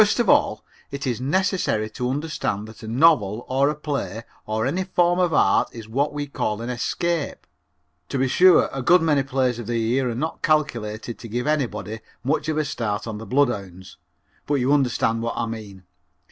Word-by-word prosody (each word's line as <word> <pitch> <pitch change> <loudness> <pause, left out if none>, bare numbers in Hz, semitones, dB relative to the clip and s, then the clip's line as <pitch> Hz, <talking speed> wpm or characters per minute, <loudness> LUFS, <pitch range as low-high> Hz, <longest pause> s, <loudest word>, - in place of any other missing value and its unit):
First 215 +3 +3
of 235 - +2
all, - - +3 0.2
it 140 +1 -5
is 125 -2 -2
necessary 175 - 0
to 125 +2 -3
understand 135 -7 -2
that 110 - -13
a 110 - -8
novel 120 -4 +3
or 135 +2 +2
a 150 - -2
play 140 -7 -4 0.2
or 110 +1 -1
any 175 +8 0
form 175 -1 +2
of 180 -2 +2
art - - +3
is 115 -2 -9
what 140 +7 0
we 145 0 -3
call 110 -6 -2
an 120 +2 -4
escape. 155 +6 -2 0.6
To - - -2
be 135 0 +2
sure, 180 +7 +6
a 135 - -3
good 170 +6 +5
many 150 -3 +3
plays 130 -3 0
of 115 - -7
the 120 - -1
year 120 +3 +1
are 115 - -3
not 155 +6 -3
calculated 120 -8 -1
to 115 - -8
give 120 +3 -3
anybody 130 -7 -1 0.2
much 155 +4 0
of 155 - -1
a 155 - +1
start 115 -6 -3
on 110 -2 -5
the 110 - -9
bloodhounds, 100 -9 -1 0.5
but 145 - +1
you 135 +1 +2
understand 120 -4 +1
what 115 0 -3
I - - 0
mean. 105 -4 -8
130 Hz, 200 wpm, -23 LUFS, 115-150 Hz, 0.6 s, sure